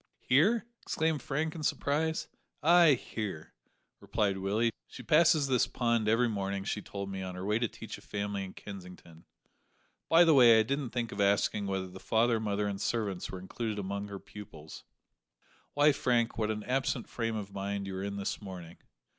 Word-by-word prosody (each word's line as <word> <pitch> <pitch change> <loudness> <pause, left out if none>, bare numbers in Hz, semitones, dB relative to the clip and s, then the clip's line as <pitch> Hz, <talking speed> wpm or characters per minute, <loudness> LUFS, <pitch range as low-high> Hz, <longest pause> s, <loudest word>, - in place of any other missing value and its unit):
"Here!" 195 - +3 0.2
exclaimed 160 -2 -1
Frank 155 +3 -2
in 165 - -7
surprise. 155 +2 0 0.4
"Ay, 170 -1 +7
here," 105 -9 -6 0.5
repeated 100 -2 -1
Willie; 105 +5 +1 0.2
"she - - -10
passes 160 -1 +4
this 130 -3 +2
pond 115 -3 0
every 115 +3 +3
morning, 100 -2 -2
she 105 +1 -3
told 100 0 -6
me, 95 0 -4
on 95 -1 -5
her 90 +1 -5
way 105 +2 +1
to 120 - +1
teach - - -9
a - - -18
family 100 -1 -3
in 95 - -8
Kensington; 90 -4 -11 0.8
by 165 +1 +7
the 165 -2 +5
way, 120 -5 +8
I - - +4
didn't 135 +2 -2
think 120 -1 -3
of 100 - -3
asking 100 0 +2
whether 95 -1 -2
the 95 +1 -11
father, 115 +2 +2
mother, 105 -1 -1
and 100 -1 -3
servants 105 -6 -2
were 95 - -6
included 105 +3 -4
among 100 +1 -3
her 100 -1 -6
pupils. 95 -7 -11 0.9
Why, 145 +1 +6
Frank, 120 -4 +1
what 110 -1 -1
an 105 -1 -3
absent 130 -1 -1
frame 115 -1 -3
of 100 -2 -6
mind 100 0 -3
you 95 -1 -5
are 95 - -4
in 100 0 -3
this 100 +2 -3
morning! 90 -4 -9
105 Hz, 185 wpm, -31 LUFS, 100-125 Hz, 0.9 s, way